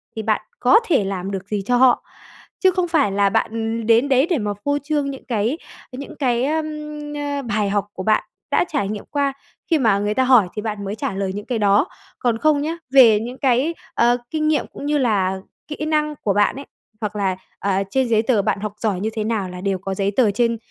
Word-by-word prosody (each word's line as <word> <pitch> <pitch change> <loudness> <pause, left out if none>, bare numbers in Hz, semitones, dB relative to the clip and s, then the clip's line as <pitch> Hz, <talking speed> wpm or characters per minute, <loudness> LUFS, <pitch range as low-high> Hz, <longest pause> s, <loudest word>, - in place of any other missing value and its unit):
thì 220 - -3
bạn 215 0 0 0.2
có 370 - +6
thể 310 - +3
làm 195 0 -3
được 195 -1 -5
gì 205 -1 -2
cho 245 +3 +2
họ, 255 0 +4 0.6
chứ 375 - +4
không 360 -1 0
phải 305 - +2
là 200 0 +2
bạn, 195 - 0 0.3
ừ, 230 - -4
đến 230 +5 +3
đấy 265 +1 +4
để 340 - +2
mà 210 -3 -2
phô 285 0 +2
trương 290 -1 -1
những 270 - -10
cái 230 +4 0 0.3
những 270 +2 -8
cái, 245 -3 +1
ờm, 310 +2 0 0.5
ơ, 285 -1 -2
bài 215 -5 -1
học 205 0 0
của 185 - -6
bạn 215 +2 +2 0.3
đã - - +3
trải 275 -10 -1
nghiệm 210 -1 -5
qua. 280 -1 0 0.4
Khi 320 - +4
mà 220 -6 +3
người 205 +1 0
ta 260 - +2
hỏi 250 -7 +5
thì 210 - -4
bạn 210 -2 -4
mới 200 +1 -4
trả 215 - -3
lời 195 0 -2
những 205 - -6
cái 245 -3 -2
đó, 205 - +3 0.3
còn 235 -2 +1
không 300 +2 +2
nhớ, 320 +3 -2 0.2
về 235 -6 +7
những 245 +4 -6
cái, 265 +5 +2 0.2
ờ, 240 +1 +3
kinh 310 -1 -1
nghiệm 310 -1 +1
cũng - - -7
như 295 0 +1
là 195 -7 +1 0.3
kỹ 300 0 -4
năng 305 -1 0
của 200 - +2
bạn 205 +1 +2
ấy, 275 +1 -8 0.4
hoặc 210 -1 -3
là, 195 -2 0 0.2
ờ, 195 -1 0
trên 265 +3 +1
giấy 220 -2 +3
tờ 225 -2 +2
bạn 195 - -1
học 210 -1 -4
giỏi 205 -5 -1
như 215 +3 -1
thế 220 - -2
nào 215 -4 -1
là 180 0 -8
đều 195 0 0
có 195 +1 -4
giấy 195 +1 0
tờ 235 -6 +4
trên, 230 +2 +1
230 Hz, 240 wpm, -21 LUFS, 205-280 Hz, 0.6 s, về